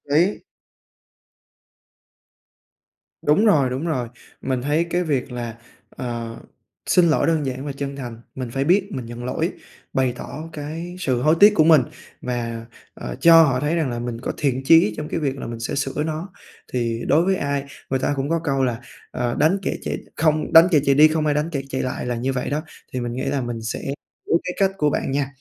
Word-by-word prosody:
lý. 180 Hz, -, +2 dB, 2.8 s
Đúng 155 Hz, +10 st, +3 dB
rồi, 145 Hz, -11 st, +4 dB
đúng 130 Hz, +6 st, -3 dB
rồi. 125 Hz, -8 st, -1 dB, 0.3 s
Mình 130 Hz, -2 st, -1 dB
thấy 150 Hz, +5 st, +1 dB
cái 175 Hz, +1 st, +1 dB
việc 140 Hz, -5 st, -1 dB
là, 120 Hz, -2 st, -5 dB, 0.3 s
ờ, 115 Hz, -2 st, -5 dB, 0.5 s
xin 180 Hz, -1 st, +4 dB
lỗi 155 Hz, -, +2 dB
đơn 160 Hz, -3 st, +1 dB
giản 130 Hz, +1 st, -4 dB
và 145 Hz, -, -3 dB
chân 140 Hz, 0 st, -5 dB
thành, 120 Hz, -4 st, -7 dB
mình 130 Hz, -3 st, -4 dB
phải 135 Hz, +2 st, 0 dB
biết 190 Hz, +6 st, +3 dB
mình 130 Hz, -7 st, -5 dB
nhận 120 Hz, +1 st, -8 dB
lỗi, 160 Hz, +7 st, -1 dB, 0.4 s
bày 130 Hz, -2 st, +1 dB
tỏ 160 Hz, +3 st, -7 dB
cái 160 Hz, +4 st, -6 dB
sự 130 Hz, -7 st, 0 dB
hối 155 Hz, +4 st, +4 dB
tiếc 205 Hz, +1 st, +8 dB
của 155 Hz, -, +5 dB
mình 155 Hz, -3 st, +7 dB, 0.4 s
và, 115 Hz, -2 st, -3 dB, 0.3 s
ờ, -, -, -6 dB
cho 165 Hz, -1 st, +8 dB
họ 130 Hz, -4 st, +2 dB
thấy 150 Hz, +3 st, 0 dB
rằng 160 Hz, -5 st, 0 dB
là 120 Hz, -1 st, -3 dB
mình 120 Hz, -1 st, -5 dB
có -, -, -2 dB
thiện 135 Hz, -3 st, 0 dB
chí 160 Hz, -9 st, +6 dB
trong 150 Hz, -, -4 dB
cái -, -, -2 dB
việc 140 Hz, -3 st, -1 dB
là -, -, -6 dB
mình 115 Hz, -1 st, -6 dB
sẽ 115 Hz, -, -3 dB
sửa 140 Hz, +1 st, -1 dB
nó. 160 Hz, +4 st, -4 dB, 0.4 s
Thì 115 Hz, -2 st, -1 dB
đối 165 Hz, +3 st, +4 dB
với 190 Hz, 0 st, +2 dB
ai 140 Hz, -3 st, -2 dB, 0.2 s
người 130 Hz, 0 st, 0 dB
ta 145 Hz, -, 0 dB
cũng 140 Hz, +2 st, -2 dB
có 165 Hz, -, +1 dB
câu 135 Hz, -2 st, +1 dB
là 120 Hz, -2 st, -1 dB, 0.3 s
"Ờ, 120 Hz, -1 st, -2 dB
đánh 160 Hz, +6 st, +4 dB
kẻ -, -, -2 dB
chạy -, -, -3 dB, 0.2 s
không 155 Hz, -1 st, +1 dB
đánh 165 Hz, +2 st, +9 dB
kẻ 150 Hz, -, +5 dB
chạy 140 Hz, -1 st, +4 dB
đi, 155 Hz, +2 st, +8 dB
không 155 Hz, 0 st, 0 dB
ai 150 Hz, -1 st, +2 dB
đánh 150 Hz, +3 st, 0 dB
kẻ 140 Hz, -4 st, -2 dB
chạy 130 Hz, -, -2 dB
lại" 130 Hz, -1 st, -3 dB
là 125 Hz, -, -1 dB
như 130 Hz, +3 st, -1 dB
vậy 125 Hz, -, -2 dB
đó, 150 Hz, +2 st, -1 dB, 0.3 s
thì 130 Hz, -, -2 dB
mình 120 Hz, -1 st, -3 dB
nghĩ 130 Hz, -, -3 dB
là 140 Hz, -, -1 dB
mình 120 Hz, -2 st, -4 dB
sẽ 110 Hz, -, -4 dB, 0.5 s
biết 165 Hz, -, +4 dB
cái 180 Hz, -, -3 dB
cách 195 Hz, -1 st, +3 dB
của 150 Hz, -4 st, +2 dB
bạn 135 Hz, -, -2 dB
nha, 140 Hz, 0 st, 0 dB
140 Hz, 215 wpm, -22 LUFS, 125-160 Hz, 2.8 s, đánh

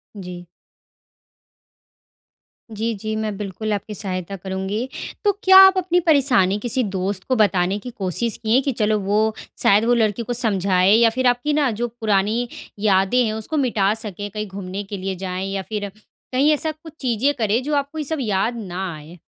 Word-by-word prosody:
जी। 180 Hz, -3 st, -8 dB, 2.3 s
जी, 225 Hz, +2 st, -2 dB
जी, 215 Hz, +2 st, -4 dB
मैं 215 Hz, -2 st, -2 dB
बिल्कुल 210 Hz, +1 st, -4 dB
आपकी 210 Hz, +1 st, -4 dB
सहायता 185 Hz, -1 st, -4 dB
करूँगी। 190 Hz, +5 st, -4 dB, 0.4 s
तो 410 Hz, -, +4 dB
क्या 380 Hz, 0 st, +8 dB
आप 385 Hz, 0 st, +9 dB
अपनी 360 Hz, -1 st, +2 dB
परेशानी 260 Hz, -, +3 dB
किसी 245 Hz, +3 st, 0 dB
दोस्त 195 Hz, -1 st, -3 dB
को 255 Hz, -, +3 dB
बताने 195 Hz, -3 st, +2 dB
की 250 Hz, -, -8 dB
कोशिश 205 Hz, +3 st, -2 dB
किए 230 Hz, +4 st, +2 dB
कि 275 Hz, -, -1 dB
चलो 215 Hz, -2 st, +1 dB
वो 210 Hz, +3 st, +1 dB, 0.3 s
शायद 205 Hz, +3 st, +4 dB
वो 245 Hz, -, +3 dB
लड़की 225 Hz, 0 st, +1 dB
को 245 Hz, -, -3 dB
समझाए 195 Hz, -5 st, +2 dB
या 230 Hz, 0 st, +5 dB
फिर 255 Hz, +3 st, 0 dB
आपकी 245 Hz, +5 st, +1 dB
ना 290 Hz, -3 st, +2 dB
जो 240 Hz, -, +1 dB
पुरानी 220 Hz, +1 st, 0 dB, 0.3 s
यादें 200 Hz, +4 st, +3 dB
हैं, 215 Hz, -1 st, -1 dB
उसको 220 Hz, +8 st, -3 dB
मिटा 215 Hz, -7 st, +2 dB
सकें 205 Hz, -2 st, -6 dB
कहीं 210 Hz, +1 st, -5 dB
घूमने 195 Hz, +1 st, -6 dB
के 200 Hz, 0 st, -7 dB
लिए 190 Hz, 0 st, -4 dB
जाएँ 185 Hz, 0 st, -4 dB
या 195 Hz, -, -2 dB
फिर 205 Hz, -2 st, -3 dB, 0.4 s
कहीं 280 Hz, +4 st, +4 dB
ऐसा 310 Hz, +1 st, 0 dB
कुछ 315 Hz, 0 st, -14 dB
चीज़ें 255 Hz, +2 st, +1 dB
करें, 220 Hz, +2 st, +1 dB
जो 295 Hz, +2 st, -1 dB
आपको 285 Hz, +2 st, -2 dB
ये 305 Hz, -, -2 dB
सब 315 Hz, +2 st, -2 dB
याद 215 Hz, +1 st, 0 dB
ना 190 Hz, -1 st, -5 dB
आए? 155 Hz, +3 st, -12 dB
215 Hz, 180 wpm, -21 LUFS, 195-245 Hz, 2.3 s, आप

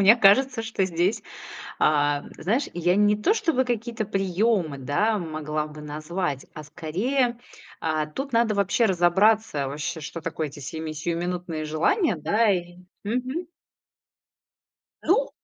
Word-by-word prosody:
мне 200 Hz, +3 st, +8 dB
кажется, 235 Hz, +3 st, +4 dB
что 220 Hz, -4 st, -1 dB
здесь, 180 Hz, +3 st, 0 dB, 0.6 s
а, 145 Hz, -1 st, +3 dB
м, -, -, -12 dB
знаешь, 225 Hz, -, 0 dB
я 175 Hz, +1 st, +1 dB
не 210 Hz, 0 st, +4 dB
то, 345 Hz, -, +2 dB
чтобы 330 Hz, -, +1 dB
какие-то 235 Hz, -2 st, -2 dB
приёмы, 195 Hz, -5 st, 0 dB
да, 205 Hz, -, +1 dB
могла 155 Hz, -3 st, -3 dB
бы 150 Hz, 0 st, -11 dB
назвать, 150 Hz, 0 st, -3 dB
а, 155 Hz, -, -7 dB
скорее, 235 Hz, -, -1 dB, 0.4 s
а, 155 Hz, -1 st, 0 dB
тут 270 Hz, -, -6 dB
надо 230 Hz, -2 st, +3 dB
вообще 200 Hz, +4 st, +2 dB
разобраться 190 Hz, -3 st, +3 dB
вообще, 145 Hz, +3 st, -4 dB
что 155 Hz, +2 st, -6 dB
такое 160 Hz, -1 st, -3 dB
эти 145 Hz, +1 st, -11 dB
семи 160 Hz, +3 st, -5 dB
сиюминутные 170 Hz, 0 st, -3 dB
желания 185 Hz, -, +2 dB
да 205 Hz, +9 st, +2 dB
и. 175 Hz, -2 st, -2 dB, 0.3 s
Мгм. 255 Hz, -, -2 dB, 1.5 s
Ну 480 Hz, +9 st, +2 dB
180 Hz, 135 wpm, -25 LUFS, 155-225 Hz, 1.5 s, мне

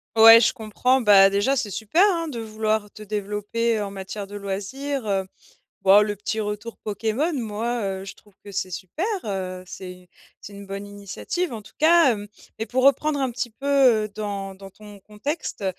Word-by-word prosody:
Ouais, 225 Hz, +1 st, +10 dB
je 235 Hz, -, +3 dB
comprends. 250 Hz, +4 st, +1 dB
Bah 195 Hz, -3 st, +7 dB
déjà, 205 Hz, +8 st, +2 dB
c'est 205 Hz, -4 st, -2 dB
super, 225 Hz, -, +2 dB
hein, 335 Hz, -1 st, -2 dB
de 245 Hz, -6 st, -5 dB
vouloir 215 Hz, -1 st, -2 dB
te -, -, -13 dB
développer 210 Hz, +2 st, -2 dB
en 200 Hz, -, -3 dB
matière 195 Hz, +1 st, -7 dB
de 205 Hz, -, -10 dB
loisirs, 215 Hz, +7 st, -4 dB
heu, 195 Hz, -2 st, 0 dB, 0.6 s
boh 195 Hz, +2 st, +7 dB
le 205 Hz, -1 st, -2 dB
petit 220 Hz, +2 st, -3 dB
retour 210 Hz, +2 st, -5 dB
Pokémon, 225 Hz, +9 st, -2 dB
moi, 235 Hz, -2 st, -2 dB, 0.2 s
heu, -, -, -8 dB
je 195 Hz, -, -8 dB
trouve 205 Hz, -2 st, -23 dB
que 200 Hz, -, -9 dB
c'est 185 Hz, -1 st, -3 dB
super 200 Hz, -, -4 dB, 0.2 s
heu, 185 Hz, -3 st, -4 dB
c'est 185 Hz, -1 st, -8 dB
u -, -, -23 dB, 0.3 s
c'est 205 Hz, -, -11 dB
une 200 Hz, 0 st, -10 dB
bonne 195 Hz, +1 st, -6 dB
initiative, 205 Hz, -, -4 dB
en 220 Hz, -, -6 dB
tout -, -, -17 dB
cas, 325 Hz, -2 st, +6 dB
hem 205 Hz, -2 st, -3 dB, 0.3 s
mais 220 Hz, -, -3 dB
pour 255 Hz, +4 st, 0 dB
reprendre 285 Hz, +2 st, +3 dB
un 265 Hz, -2 st, 0 dB
petit 240 Hz, 0 st, -4 dB
peu, 275 Hz, +5 st, -9 dB, 0.4 s
heu, -, -, -12 dB
dans 200 Hz, -2 st, -4 dB
dans 195 Hz, 0 st, -11 dB
ton 210 Hz, +1 st, -14 dB
contexte. 210 Hz, -, -5 dB
210 Hz, 195 wpm, -23 LUFS, 200-240 Hz, 0.6 s, Ouais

